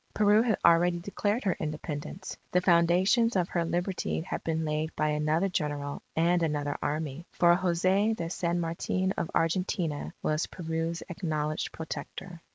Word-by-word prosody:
Peru 210 Hz, +1 st, +5 dB
had 225 Hz, -4 st, +1 dB
already 175 Hz, +1 st, +5 dB
declared 205 Hz, +5 st, -1 dB
her 190 Hz, -4 st, +1 dB
Independence. 155 Hz, +3 st, -5 dB, 0.2 s
The 180 Hz, -, +5 dB
foundations 185 Hz, +7 st, +4 dB
of 180 Hz, -2 st, +1 dB
her 170 Hz, -, 0 dB
Liberty 175 Hz, +1 st, -1 dB
had 165 Hz, -, -5 dB
been 160 Hz, -1 st, -1 dB
laid 155 Hz, +1 st, -2 dB
by 155 Hz, 0 st, +1 dB
another 155 Hz, +4 st, +1 dB
General 145 Hz, -5 st, -2 dB
and 170 Hz, +2 st, +3 dB
another 145 Hz, -3 st, -1 dB
Army. 155 Hz, +2 st, -3 dB
For 175 Hz, 0 st, +5 dB
Jose 185 Hz, +4 st, +2 dB
de 170 Hz, -6 st, -4 dB
San 175 Hz, -1 st, -1 dB
Martin 175 Hz, +3 st, -1 dB
of -, -, -2 dB
Argentina, 165 Hz, -2 st, 0 dB
was 155 Hz, +1 st, 0 dB
Peru's 165 Hz, 0 st, -3 dB
acknowledged 155 Hz, -4 st, -2 dB
Protector. 165 Hz, +3 st, -7 dB
170 Hz, 150 wpm, -29 LUFS, 155-185 Hz, 0.2 s, Peru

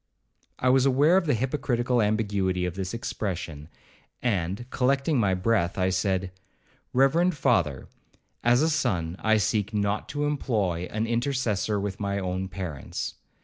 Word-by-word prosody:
I 125 Hz, -, +1 dB
was 130 Hz, +1 st, +4 dB
aware 145 Hz, +6 st, +4 dB
of 190 Hz, -3 st, +2 dB
the 145 Hz, -, +3 dB
hypocritical 125 Hz, -1 st, 0 dB
ambiguity 100 Hz, -4 st, 0 dB
of 90 Hz, -, -2 dB
this 95 Hz, 0 st, -4 dB
expression; 85 Hz, -9 st, -4 dB, 0.5 s
and, 100 Hz, 0 st, -1 dB
collecting 135 Hz, +2 st, +1 dB
my 95 Hz, -4 st, +2 dB
breath, 90 Hz, -2 st, +1 dB
I 95 Hz, 0 st, +2 dB
said, 95 Hz, 0 st, 0 dB, 0.6 s
'Reverend 155 Hz, +6 st, +3 dB
father, 85 Hz, -, +1 dB, 0.6 s
as 120 Hz, +4 st, +4 dB
a 160 Hz, -, +3 dB
son 90 Hz, -, 0 dB
I 110 Hz, 0 st, +3 dB
seek 105 Hz, +1 st, 0 dB
not 100 Hz, 0 st, -1 dB
to 145 Hz, 0 st, -1 dB
employ 105 Hz, -, -1 dB
an 110 Hz, +1 st, -1 dB
intercessor 115 Hz, -4 st, 0 dB
with 100 Hz, -1 st, -4 dB
my 100 Hz, 0 st, -1 dB
own 95 Hz, 0 st, -2 dB
parents. 90 Hz, -8 st, -5 dB
105 Hz, 145 wpm, -26 LUFS, 95-125 Hz, 0.6 s, was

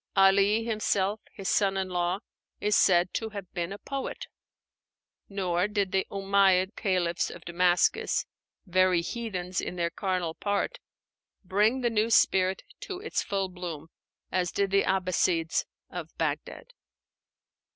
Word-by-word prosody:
Ali 200 Hz, +3 st, +5 dB
himself, 210 Hz, -2 st, 0 dB
his 195 Hz, -2 st, -7 dB
son 195 Hz, -1 st, +2 dB
in 190 Hz, -1 st, -1 dB
law, 180 Hz, +2 st, -1 dB, 0.4 s
is 210 Hz, +1 st, +2 dB
said 175 Hz, -1 st, +4 dB
to 225 Hz, -, -2 dB
have 200 Hz, -4 st, -8 dB
been 175 Hz, 0 st, -3 dB
a 200 Hz, -, -5 dB
poet; 275 Hz, +5 st, -5 dB, 1.0 s
nor 185 Hz, -2 st, 0 dB
did 205 Hz, -3 st, -1 dB
the 190 Hz, -1 st, +1 dB
Umáyyid 195 Hz, -1 st, +3 dB
Caliphs 175 Hz, -3 st, 0 dB
of -, -, -11 dB
Damascus, 175 Hz, +1 st, +2 dB, 0.4 s
"very 185 Hz, -1 st, +3 dB
heathens 185 Hz, -3 st, -3 dB
in -, -, -5 dB
their 170 Hz, -1 st, -1 dB
carnal 185 Hz, -4 st, -2 dB
part," 205 Hz, -, -2 dB, 0.6 s
bring 210 Hz, +7 st, +2 dB
the 240 Hz, -1 st, +1 dB
new 220 Hz, 0 st, +1 dB
spirit 190 Hz, -4 st, +3 dB, 0.2 s
to 380 Hz, -3 st, -6 dB
its 440 Hz, +3 st, -2 dB
full 195 Hz, -1 st, -1 dB
bloom, 175 Hz, -4 st, -7 dB, 0.4 s
as 180 Hz, -1 st, 0 dB
did 200 Hz, -1 st, 0 dB
the 200 Hz, 0 st, +3 dB
Abbassides 180 Hz, -3 st, +1 dB, 0.3 s
of -, -, -7 dB
Bagdad. -, -, -3 dB
190 Hz, 135 wpm, -28 LUFS, 180-205 Hz, 1.0 s, Ali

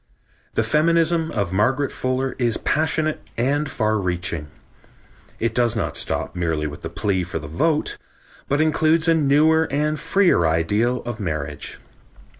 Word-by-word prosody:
The 115 Hz, -, +2 dB
feminism 165 Hz, +5 st, +2 dB
of 100 Hz, -5 st, -2 dB
Margaret 130 Hz, +8 st, +1 dB
Fuller 130 Hz, +1 st, -2 dB
is 120 Hz, -3 st, +1 dB
passionate 155 Hz, 0 st, 0 dB, 0.2 s
and 145 Hz, +5 st, 0 dB
far 110 Hz, -2 st, 0 dB
reaching. 90 Hz, -4 st, -2 dB, 0.9 s
It 115 Hz, -1 st, 0 dB
does 120 Hz, -1 st, +2 dB
not 115 Hz, -, -2 dB
stop -, -, -2 dB
merely 80 Hz, -3 st, -1 dB
with 75 Hz, -1 st, -6 dB
the -, -, -5 dB
plea 95 Hz, -3 st, -1 dB
for 85 Hz, -, -4 dB
the -, -, -6 dB
vote, 150 Hz, -, 0 dB, 0.5 s
but 145 Hz, -, +1 dB
includes 160 Hz, +1 st, +2 dB
a 165 Hz, -, +5 dB
newer 160 Hz, +1 st, +4 dB
and 150 Hz, +2 st, 0 dB
freer 180 Hz, -, +3 dB
ideal 105 Hz, +10 st, +1 dB
of 120 Hz, -2 st, -5 dB
marriage. 80 Hz, -7 st, -4 dB
125 Hz, 145 wpm, -22 LUFS, 95-155 Hz, 0.9 s, a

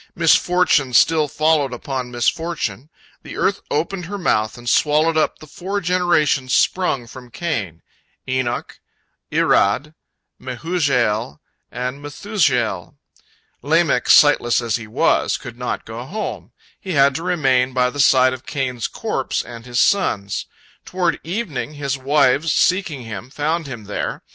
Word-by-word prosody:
Misfortune 165 Hz, -5 st, +3 dB
still 155 Hz, +5 st, +4 dB
followed 150 Hz, -2 st, +1 dB
upon 125 Hz, 0 st, -4 dB
misfortune. 130 Hz, -, -2 dB, 0.3 s
The -, -, -9 dB
earth 200 Hz, 0 st, 0 dB
opened 170 Hz, +4 st, -2 dB
her 205 Hz, +4 st, -5 dB
mouth 110 Hz, -, 0 dB
and 120 Hz, 0 st, -11 dB
swallowed 155 Hz, +5 st, +3 dB
up 155 Hz, -, +1 dB
the -, -, -13 dB
four 185 Hz, +7 st, -4 dB
generations 170 Hz, -8 st, +1 dB
sprung 180 Hz, -9 st, +1 dB
from 125 Hz, +1 st, -12 dB
Cain—Enoch, 120 Hz, -, -5 dB, 0.5 s
Irad, 140 Hz, +10 st, +2 dB, 0.5 s
Mehujael, 125 Hz, -, -1 dB, 0.3 s
and 125 Hz, +3 st, -5 dB
Methushael. 145 Hz, -, -1 dB, 0.7 s
Lamech, -, -, +1 dB
sightless 120 Hz, 0 st, +5 dB
as 120 Hz, -2 st, -1 dB
he 115 Hz, -2 st, -9 dB
was, 105 Hz, -, +1 dB
could 120 Hz, -, -10 dB
not 125 Hz, -, -3 dB
go 115 Hz, +2 st, -7 dB
home; 210 Hz, +11 st, -6 dB, 0.3 s
he 190 Hz, -3 st, -5 dB
had 140 Hz, -2 st, +4 dB
to 160 Hz, -, -4 dB
remain 135 Hz, -8 st, +1 dB
by 125 Hz, 0 st, +1 dB
the 145 Hz, -, -8 dB
side 130 Hz, -2 st, +5 dB
of 130 Hz, 0 st, -8 dB
Cain's 130 Hz, -4 st, -2 dB
corpse -, -, -3 dB
and 115 Hz, 0 st, -11 dB
his 120 Hz, 0 st, -1 dB
son's. 105 Hz, -, +1 dB, 0.4 s
Toward 175 Hz, -4 st, -1 dB
evening, 165 Hz, -, -4 dB
his 140 Hz, -2 st, -2 dB
wives, 140 Hz, +2 st, +2 dB
seeking 175 Hz, -8 st, +1 dB
him, 110 Hz, +1 st, -7 dB
found 155 Hz, +3 st, -2 dB
him 120 Hz, -5 st, -7 dB
there. 100 Hz, 0 st, -4 dB
140 Hz, 135 wpm, -20 LUFS, 120-165 Hz, 0.7 s, sightless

